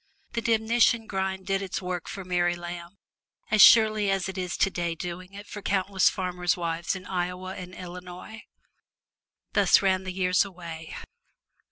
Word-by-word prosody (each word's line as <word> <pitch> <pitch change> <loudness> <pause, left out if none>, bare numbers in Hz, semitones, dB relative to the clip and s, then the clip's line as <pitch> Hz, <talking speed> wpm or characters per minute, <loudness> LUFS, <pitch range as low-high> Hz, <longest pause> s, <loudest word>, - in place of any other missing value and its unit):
The 235 - -2
demnition 230 0 +2
grind 190 -2 -3
did 195 0 0
its 195 -2 -3
work 180 -2 -4
for 195 -2 -7
Mary 175 -1 +1
Lamb 175 +1 -8 0.5
as 215 -1 +5
surely 215 -2 +7
as 195 -2 0
it 190 - -6
is 180 -2 -3
today 175 -3 0
doing 180 +3 -7
it 205 +1 -9
for 205 - -8
countless 195 -1 +2
farmers' 180 -2 -1
wives 170 +1 -2
in 185 -1 -8
Iowa 180 0 -3
and 180 0 -9
Illinois. 180 +4 -9 1.1
Thus - - +5
ran 190 -1 +2
the 185 - -4
years 180 -1 +2
away. 170 -4 -8
185 Hz, 155 wpm, -27 LUFS, 175-195 Hz, 1.1 s, surely